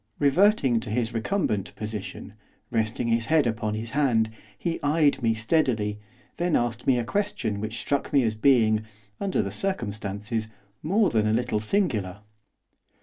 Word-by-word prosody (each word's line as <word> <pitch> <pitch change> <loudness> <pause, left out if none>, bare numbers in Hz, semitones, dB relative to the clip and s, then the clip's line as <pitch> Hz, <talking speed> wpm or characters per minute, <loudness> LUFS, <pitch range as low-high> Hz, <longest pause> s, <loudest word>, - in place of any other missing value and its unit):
Reverting 145 - +4
to 110 - -6
his 115 +1 -1
recumbent 115 - -1
position, 105 -1 -6 0.4
resting 110 +1 0
his 115 0 +1
head 155 -2 +4
upon 110 -2 -1
his 110 +1 -5
hand, 120 -6 +2 0.3
he 165 +9 -3
eyed 145 -1 +2
me 115 -1 +2
steadily; 110 -4 0 0.4
then 175 -1 +1
asked 120 0 -1
me 130 -2 +4
a 120 - 0
question 200 - -1
which 110 +1 -4
struck 140 -1 -1
me 140 -3 +4
as 110 -2 +1
being, 110 -2 +3 0.4
under 195 -2 0
the - - -4
circumstances, 110 - -3 0.3
more 200 +7 +2
than 110 -1 +2
a 110 - +2
little 120 -2 0
singular. 105 - -1
115 Hz, 150 wpm, -26 LUFS, 110-145 Hz, 0.4 s, Reverting